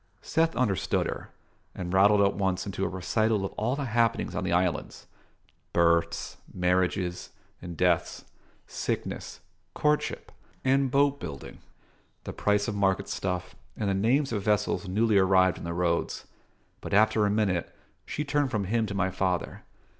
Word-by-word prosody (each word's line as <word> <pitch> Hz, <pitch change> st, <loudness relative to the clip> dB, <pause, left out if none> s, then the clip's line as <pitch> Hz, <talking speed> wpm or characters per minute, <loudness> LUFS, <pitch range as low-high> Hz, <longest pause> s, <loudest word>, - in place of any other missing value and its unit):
Seth 165 Hz, 0 st, +1 dB
understood 105 Hz, -8 st, +1 dB
her, -, -, -5 dB, 0.5 s
and 90 Hz, 0 st, -5 dB
rattled 100 Hz, +2 st, +5 dB
at 100 Hz, 0 st, +3 dB
once 95 Hz, -2 st, -1 dB
into 95 Hz, -1 st, -4 dB
a -, -, +1 dB
recital 105 Hz, +3 st, 0 dB
of -, -, -4 dB
all 115 Hz, +5 st, -1 dB
the 140 Hz, -1 st, -3 dB
happenings 115 Hz, -1 st, +1 dB
on -, -, -2 dB
the -, -, -1 dB
islands: 85 Hz, -3 st, -1 dB, 0.7 s
births, 85 Hz, 0 st, +1 dB
marriages, 90 Hz, 0 st, 0 dB, 0.3 s
and 85 Hz, -2 st, -8 dB
deaths, 90 Hz, -2 st, +1 dB, 0.4 s
sickness, -, -, -4 dB, 0.3 s
courtship, 150 Hz, 0 st, 0 dB, 0.3 s
and 135 Hz, 0 st, +3 dB
boat 140 Hz, +2 st, +2 dB
building, 70 Hz, -5 st, -8 dB, 0.6 s
the -, -, -6 dB
price 105 Hz, 0 st, +1 dB
of 110 Hz, -, -2 dB
market 100 Hz, -1 st, 0 dB
stuff, 90 Hz, -1 st, -3 dB, 0.2 s
and 105 Hz, -3 st, 0 dB
the -, -, +1 dB
names 120 Hz, +8 st, +2 dB
of 105 Hz, -, -1 dB
vessels 105 Hz, -1 st, 0 dB
newly 105 Hz, +2 st, +3 dB
arrived 95 Hz, -1 st, +4 dB
in -, -, -8 dB
the 85 Hz, -, -3 dB
roads. 85 Hz, -1 st, -1 dB, 0.6 s
But -, -, -2 dB
after 110 Hz, 0 st, +4 dB
a -, -, +1 dB
minute 100 Hz, -5 st, 0 dB, 0.3 s
she 150 Hz, -, -4 dB
turned 145 Hz, -1 st, +1 dB
from 105 Hz, -5 st, -1 dB
him 110 Hz, +3 st, 0 dB
to 100 Hz, -, -5 dB
my 95 Hz, -1 st, 0 dB
father. 90 Hz, -2 st, -2 dB
100 Hz, 155 wpm, -27 LUFS, 90-110 Hz, 0.7 s, rattled